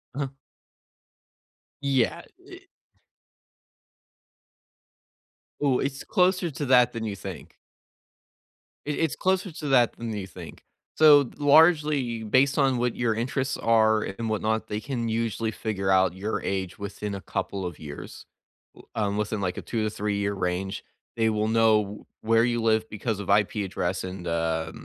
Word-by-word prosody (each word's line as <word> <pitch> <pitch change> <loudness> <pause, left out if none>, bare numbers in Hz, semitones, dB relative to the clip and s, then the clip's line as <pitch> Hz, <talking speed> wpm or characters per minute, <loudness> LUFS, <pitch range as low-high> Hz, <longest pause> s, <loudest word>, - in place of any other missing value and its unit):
Uh-huh. 140 -1 -2 1.5
Yeah, 135 -4 +1 0.2
it - - -14 3.0
Ooh, 135 -3 +3
it's 135 0 -3
closer 185 -2 +2
to 145 +1 -4
that 125 -1 +5
than 115 - -4
you 105 -3 -3
think. - - -9 1.3
It 150 -1 -2
it's 160 -3 0
closer 190 0 0
to 150 -1 -6
that 125 -3 +4
than 115 -1 -4
you 100 -3 -5
think, 90 - -11 0.3
so 145 -4 +7
largely 145 -6 +4
based 130 +5 +3
on 135 -3 +3
what 120 0 0
your 120 -2 +1
interests 130 +3 -2
are 110 -1 +3
and 110 +3 -4
whatnot, 110 +1 -1
they 105 0 -3
can 120 -3 -3
usually 115 0 -1
figure 100 -4 -2
out 95 -2 +4
your 105 +4 -3
age 95 -2 -3
within 100 0 -5
a 100 - -7
couple 95 0 -4
of 85 -4 -6
years, 75 -2 -9 0.7
um, 105 -2 -1
within, 105 0 -2
like, 90 -2 -2
a - - -3
two 115 -2 -2
to 110 - 0
three-year 100 -1 -2
range, 95 0 -3 0.3
they 110 0 +3
will 110 0 0
know 110 -2 +2 0.2
where 115 +1 +3
you 120 -1 0
live 110 -1 +2
because 110 0 -3
of 100 -1 -6
IP 105 +1 +3
address 90 0 -2
and, 90 -1 -6
uh, 80 -1 -1
110 Hz, 145 wpm, -26 LUFS, 100-130 Hz, 3.0 s, so